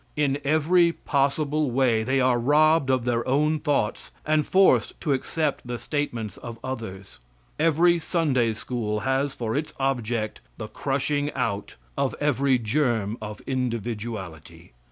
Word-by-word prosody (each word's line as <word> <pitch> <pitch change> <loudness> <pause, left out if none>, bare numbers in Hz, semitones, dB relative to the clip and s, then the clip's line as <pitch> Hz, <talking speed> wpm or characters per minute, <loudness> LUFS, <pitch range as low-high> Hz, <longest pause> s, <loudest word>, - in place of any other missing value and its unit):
In 145 -2 +1
every 165 +4 +3
possible 145 +1 0
way 120 -3 +2
they 130 +4 +1
are 125 -2 +3
robbed 150 +3 +4
of 130 -2 +1
their 120 0 0
own 150 +4 +2
thoughts 145 -8 -1 0.2
and 155 -1 +1
forced 190 0 +3
to 150 -4 +1
accept 145 0 -2
the 120 0 -3
statements 120 -7 -3
of 115 -1 -8
others. 105 - -7 0.4
Every 165 +2 +4
Sunday 135 -10 +1
school 110 -2 -3
has 135 +1 0
for 115 -1 -3
its 150 +2 -2
object 120 -5 -1 0.2
the 110 - -6
crushing 145 +1 -1
out 115 -6 -3 0.2
of 140 -1 -1
every 140 -2 +2
germ 115 -3 0
of 105 -1 -7
individuality. 115 - -4
130 Hz, 135 wpm, -25 LUFS, 115-150 Hz, 0.4 s, robbed